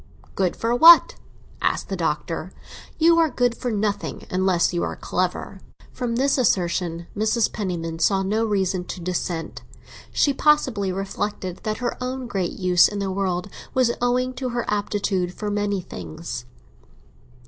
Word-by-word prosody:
"Good 185 -2 0
for 230 +1 -1
what?" 330 +6 +8 0.5
asked - - 0
the - - -2
Doctor. - - -2 0.5
"You 335 +1 +5
are 325 -1 +4
good 245 -2 +1
for 250 - -3
nothing 205 -2 -2
unless 185 -1 +2
you 175 - 0
are - - -2
clever." 185 +1 -3 0.3
From 245 -2 -3
this 275 +2 +2
assertion 175 -6 0
Mrs. 220 +2 +1
Penniman 170 -5 -3
saw 195 +3 +2
no 215 +4 0
reason 190 -4 0
to - - -6
dissent; 175 -2 -3 0.5
she 285 - +2
possibly 265 -10 +2
reflected 195 -1 -4
that 215 0 -2
her 245 0 -3
own 255 0 -3
great 195 -7 -2
use 180 -2 +4
in 205 - -5
the 200 -1 -2
world 185 -1 -1 0.3
was 255 -2 +3
owing 250 +1 +1
to 255 0 -4
her 240 -1 -2
aptitude 200 -3 -1
for 210 -1 -3
many 205 -1 -1
things. 155 -6 -7
205 Hz, 150 wpm, -23 LUFS, 180-245 Hz, 0.5 s, what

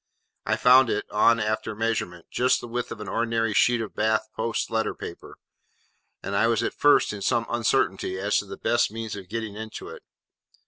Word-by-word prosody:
I - - +2
found 130 0 +6
it, - - -1
on 115 +2 +4
after 110 0 -2
measurement, 105 -6 -2
just 125 +1 +2
the - - -8
width 120 +1 -4
of 105 - -7
an 105 - -7
ordinary 115 +1 0
sheet 120 +2 +3
of 110 - -6
Bath 110 0 +1
post 115 +1 -2
letter 110 0 -1
paper; - - -9 0.9
and 100 +1 -3
I 110 +3 +3
was 115 -2 +1
at - - -2
first 145 -6 +3
in 105 - -7
some 115 +4 +1
uncertainty 115 -5 0
as 100 +2 +1
to 105 - -6
the 95 0 -8
best 120 - +1
means 110 -1 -5
of 95 -3 -10
getting 110 -2 -4
into 110 0 -7
it. - - -10
110 Hz, 195 wpm, -25 LUFS, 105-115 Hz, 0.9 s, found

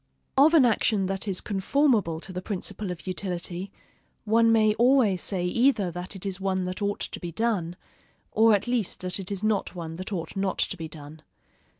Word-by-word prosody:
Of 295 +5 +6
an 285 -6 +7
action 215 -3 +2
that 195 +2 -3
is 190 -2 -1
conformable 205 - +1
to 190 - -8
the 180 - -4
principle 200 +1 -4
of 180 -1 -6
utility, 185 0 -4 0.5
one 225 +1 +4
may 215 -1 +4
always 235 -5 +3
say 185 -3 -1
either 220 -1 +2
that 180 +3 -6
it 190 - -8
is 195 -1 -4
one 190 -1 0
that 185 +2 -4
ought 205 0 -1
to - - -5
be 175 -2 -5
done, 180 -4 -1 0.6
or 220 0 +5
at 200 - -2
least 240 -5 -1
that 185 +1 -3
it 190 +1 -5
is 200 0 -3
not 215 -3 0
one 165 -2 -6
that 185 +3 -6
ought 175 -1 -4
not 195 -1 -1
to - - 0
be 165 -3 -6
done. 155 0 -10
195 Hz, 200 wpm, -26 LUFS, 180-220 Hz, 0.6 s, an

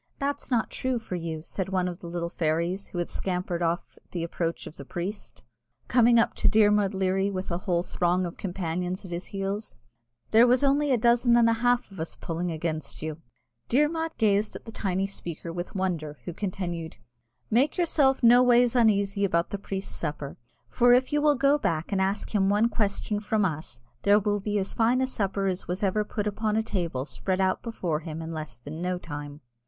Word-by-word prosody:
"That's 285 +1 -3
not 235 -4 +1
true 260 -1 -1
for 225 -5 -7
you," 165 -3 -4
said 190 +2 -4
one 185 -1 0
of 175 0 -5
the 170 - -9
little 170 0 -3
fairies 170 +4 -1
who - - -8
had 175 - -1
scampered 180 -2 -2
off 170 0 -2
at - - -38
the 175 -2 -2
approach 170 0 -3
of 155 - -10
the - - -7
priest, 180 +8 -6 0.4
coming 240 -1 +5
up 230 - +3
to - - +3
Dermod 210 -2 +4
Leary 190 +1 +1
with 190 -2 -4
a 170 - -1
whole 175 -2 0
throng 180 +1 0
of 170 - -6
companions 180 0 -3
at 180 - -9
his 175 +1 -4
heels; 200 +2 -4 0.6
"there 230 +3 +7
was 250 +3 +3
only 285 +1 +3
a 255 - +4
dozen 235 +1 +4
and 235 -1 +5
a 230 - +4
half 245 -1 +1
of 195 - -11
us 160 - -4
pulling 170 +1 -3
against 160 -1 -4
you." 155 0 -5 0.5
Dermod 320 +5 +1
gazed 210 -1 +2
on - - -17
the 225 - -8
tiny 195 -3 -1
speaker 170 -4 -6
with 175 +3 -5
wonder, 165 -6 -2
who 175 - -4
continued, 175 -4 -4 0.6
"Make 260 - +3
yourself 285 -7 +3
noways 245 0 +6
uneasy 200 -4 +3
about 170 -3 +1
the 200 - -3
priest's 195 -1 -4
supper; 145 -3 -4 0.3
for 245 - +4
if 255 +3 +3
you 295 - +3
will 295 -1 +4
go 280 +2 +3
back 165 - -1
and 195 -1 +1
ask 195 +3 -1
him 195 -2 +3
one 210 +3 +3
question 210 -1 -1
from 210 0 +1
us, 155 -8 -4 0.2
there 200 +1 +5
will 205 0 +1
be 205 +1 -1
as 195 -1 -2
fine 235 +3 +3
a 260 - +2
supper 200 -6 -2
as 185 -1 0 0.2
ever 200 +2 +2
was 210 - -6
put 210 -2 -1
on 215 -1 +1
a 220 - +2
table 170 - -2
spread 185 +4 -2
out 190 -1 +1
before 180 -9 -2
him 160 0 -6
in 165 +1 -5
less 155 -6 -6
than 145 +7 -8
no 180 0 -1
time." 145 -3 -7
195 Hz, 205 wpm, -27 LUFS, 170-225 Hz, 0.6 s, there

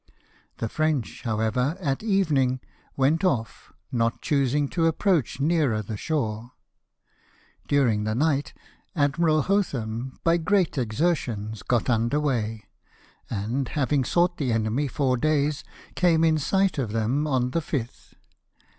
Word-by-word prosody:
The 115 - -2
French, 155 0 -1
however, 115 +7 0
at 140 -7 -1
evening, 155 - +1 0.4
went 145 +5 +2
ofl", 130 -12 -1 0.2
not 115 -1 0
choosing 140 0 +1
to 165 -2 +1
approach 165 - +1
nearer 140 -8 +1
the 105 +2 -5
shore. 115 -3 -3 1.1
During 120 -7 +2
the 110 0 -1
night 145 +1 +1 0.4
Admiral 155 +1 +2
Hotham, 130 - -1
by 165 0 +4
great 185 +1 +1
exertions, 115 - -1
got 120 -3 0
under 120 +4 +1
weigh; 115 -7 -1 0.7
and, 115 +6 -2
having 145 -1 0
sought 175 +6 +1
the 135 -5 -1
enemy 115 +6 0
four 130 -1 0
days, 150 +1 +1 0.3
came 165 -3 +3
in 160 -1 +3
sight 190 +2 +1
of 115 -6 -2
them 120 +7 0
on 125 -3 0
the 165 - 0
fifth. 130 -6 -5
135 Hz, 130 wpm, -25 LUFS, 115-155 Hz, 1.1 s, by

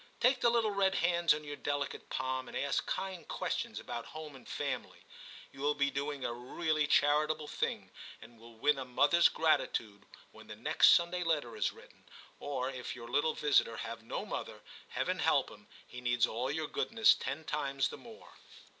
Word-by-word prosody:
Take 255 +2 +3
the 235 - +5
little 230 -2 +2
red 195 -1 +2
hands 170 -1 +3
in 150 0 +1
your 145 -1 -6
delicate 145 -1 -3
palm 130 0 -2
and - - -5
ask 140 -2 -1
kind 190 -2 -4
questions - - -3
about 120 - -6
home 155 -3 -8
and 130 - -14
family; - - -4 0.5
you 135 - -12
will 145 +1 +2
be 140 -1 +1
doing 140 0 -3
a 120 - -1
really 150 +5 -1
charitable 150 +1 +3
thing, - - -3 0.3
and 115 0 -15
will 115 0 -14
win 145 +4 +2
a - - -3
mothers 145 +7 +4
gratitude 115 -9 0 0.2
when - - -15
the - - -8
next - - +5
Sunday 175 +1 0
letter 150 -9 -1
is 105 - 0
written; - - -18 0.3
or 135 -2 -3
if 125 -2 -6
your 120 -1 -9
little 145 +4 +1
visitor 140 -6 +2
have 115 0 -6
no 115 - -5
mother, - - -5 0.3
Heaven - - -2
help - - +2
him, - - -15 0.2
he 125 - -10
needs 120 -1 +3
all 125 +4 -3
your 155 +2 -1
goodness 225 +6 +4
ten 140 +4 -4
times 140 -3 -1
the - - -8
more. 230 -2 -14
145 Hz, 185 wpm, -33 LUFS, 125-160 Hz, 0.5 s, the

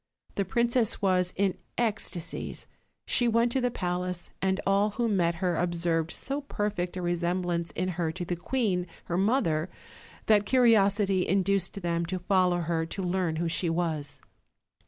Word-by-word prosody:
The 200 - -1
princess 235 +3 +1
was 185 -2 +2
in 195 -1 +1 0.2
ecstasies: 215 -7 -3 0.4
she 240 - +2
went 230 +1 +3
to 265 - +1
the 245 - +2
palace, 180 -4 -3
and 190 0 +1
all 200 +2 +3
who 235 +3 -1
met 175 -5 +2
her 180 0 0
observed 170 -2 0
so 275 - -4
perfect 205 -9 -2
a 180 - -3
re 175 0 +1
semblance 175 -1 -1
in 185 +2 -1
her 170 -2 -1
to 175 0 -4
the 175 - -2
queen 185 -2 0 0.2
her 175 - -2
mother 190 - +1 0.6
that 210 -2 +4
curiosity 205 -6 +4
induced 195 0 +1
them 170 -1 0
to 185 +2 -2
follow 180 -1 +2
her 165 0 0
to 190 +3 -4
learn 180 -2 0
who 170 +1 -1
she 170 +1 0
was. 160 -4 -2
185 Hz, 160 wpm, -28 LUFS, 175-205 Hz, 0.6 s, that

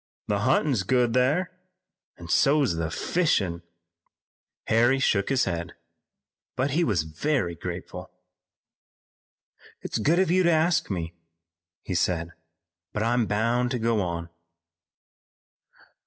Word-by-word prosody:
The 100 -1 0
huntin's 130 +1 +2
good 120 +2 +1
thar, 145 +9 +1 0.7
an' 85 - -10
so's 135 - +3
the 80 -1 -2
fishin'." 100 - 0 1.0
Harry 120 +4 +3
shook 100 -7 +1
his 135 -1 +2
head, 85 -1 -3 0.8
but 130 +2 0
he 165 +5 +2
was 100 - +1
very 85 - -1
grateful. 90 +1 -7 1.7
"It's - - -3
good 160 +4 +2
of 185 -2 +2
you 185 +1 +4
to 170 -1 +3
ask 160 +1 +2
me," 85 -4 -4 0.7
he - - -4
said, 85 -1 0 0.6
"but 105 - -1
I'm 120 -1 +1
bound 115 +4 +1
to 125 - -1
go 115 -2 +1
on." 85 -2 -4
115 Hz, 120 wpm, -26 LUFS, 90-135 Hz, 1.7 s, you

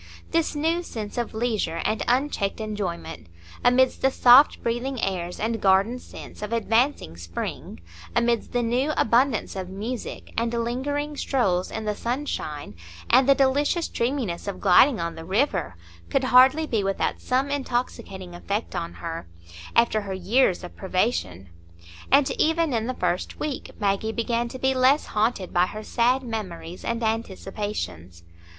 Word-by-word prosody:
This 330 -2 +1
new 325 +4 +1
sense 220 -11 -6
of 235 - -3
leisure 220 -8 -1
and 215 - 0
unchecked 245 -6 0
enjoyment 205 - -5 0.4
amidst 250 +1 +3
the 265 - +4
soft 260 +2 +6
breathing 240 +3 -2
airs 180 -3 -2
and 225 0 -1
garden 200 +6 +3
scents - - -11
of 210 +1 -5
advancing 230 - +1
spring—amidst 85 - -3
the 245 -1 0
new 255 +6 +1
abundance 235 -1 +2
of 185 -1 -5
music, 215 +6 -6
and 230 0 0
lingering 265 +6 -2
strolls 190 -12 0
in 220 -1 -5
the 210 - 0
sunshine, 235 - -4 0.4
and 255 +2 +5
the 275 - +7
delicious 285 +5 +2
dreaminess 235 -8 -2
of 200 -2 -4
gliding 220 +7 +5
on 170 0 -2
the 165 - -9
river—could 85 - -2
hardly 260 +5 +6
be 225 -8 0
without 195 0 -1
some 265 +3 0
intoxicating 240 -9 -3
effect 200 +5 -3
on 170 -1 -3
her, 165 - -6 0.5
after 230 -2 +3
her 195 -2 -5
years 190 +1 +2
of 180 - -9
privation; 185 - -1 0.6
and 275 +1 +5
even 320 -2 +2
in 225 -1 0
the 255 - -2
first 180 - -2
week 295 -3 -4
Maggie 205 +1 0
began 235 +1 -1
to 245 - -7
be 265 +1 +1
less 260 +3 +3
haunted 210 -3 -1
by 175 +1 +3
her 215 +2 -7
sad 250 +4 +1
memories 185 -7 -6
and 235 0 -2
anticipations. 195 - -4
230 Hz, 145 wpm, -25 LUFS, 190-255 Hz, 0.6 s, the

